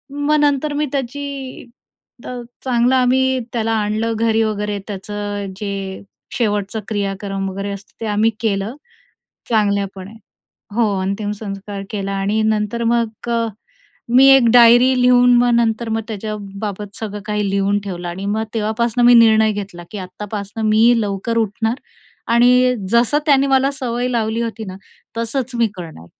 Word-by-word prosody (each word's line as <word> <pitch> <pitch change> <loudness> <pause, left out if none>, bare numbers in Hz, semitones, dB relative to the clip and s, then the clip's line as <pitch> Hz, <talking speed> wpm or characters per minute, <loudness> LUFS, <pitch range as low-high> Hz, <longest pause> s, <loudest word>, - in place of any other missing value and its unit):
मग 290 +1 +1
नंतर 290 0 +1
मी 295 +1 0
त्याची 275 0 -5 0.6
तर 250 -1 -6 0.2
चांगलं, 250 0 +2
आम्ही 260 +1 +2
त्याला 225 -1 -1
आणलं 220 +1 0
घरी 225 0 +1
वगैरे, 210 -1 -2
त्याचं 205 0 -5
जे 195 -2 -5 0.4
शेवटचं 210 -2 -1
क्रियाक्रम 195 -1 -3
वगैरे 195 +1 -5
असतं 200 0 -9
ते - - -3
आम्ही 210 +2 +2
केलं, 210 +1 -1 0.7
चांगल्यापणे. 200 -3 -1 0.6
हो, 235 0 +3
अंतिम 200 +2 -2
संस्कार 200 -1 -6
केला 195 -2 -3
आणि 195 +2 0
नंतर 220 +2 0
मग 230 -1 -1
अ, 230 -1 +1 0.7
मी 265 +1 +8
एक 255 -3 +3
डायरी 240 +1 +7
लिहून 245 0 +5
मग 245 0 +3
नंतर 230 0 +1
मग 225 0 -1
त्याच्याबाबत 205 -1 -6
सगळं 210 -2 -5
काही 210 -1 -1
लिहून 200 +1 +1
ठेवलं 175 -3 -5
आणि 185 +3 -5
मग 215 +2 -1
तेव्हापासून 230 +2 0
मी 245 - +8
निर्णय 220 -2 +5
घेतला, 200 -4 -7
की 210 - -6
आतापासून 205 +3 -5
मी 220 +3 +5
लवकर 205 +2 -2
उठणार 225 +1 0 0.6
आणि 250 +1 +5 0.2
जसं 235 +5 +3
त्याने 275 -2 +4
मला 270 0 +3
सवय 250 -3 -2
लावली 230 -1 -1
होती 225 -1 -4
ना, 185 -2 -8 0.4
तसंच 245 +2 -2
मी 235 -1 +3
करणार. 160 - -9
220 Hz, 145 wpm, -19 LUFS, 200-240 Hz, 0.7 s, मी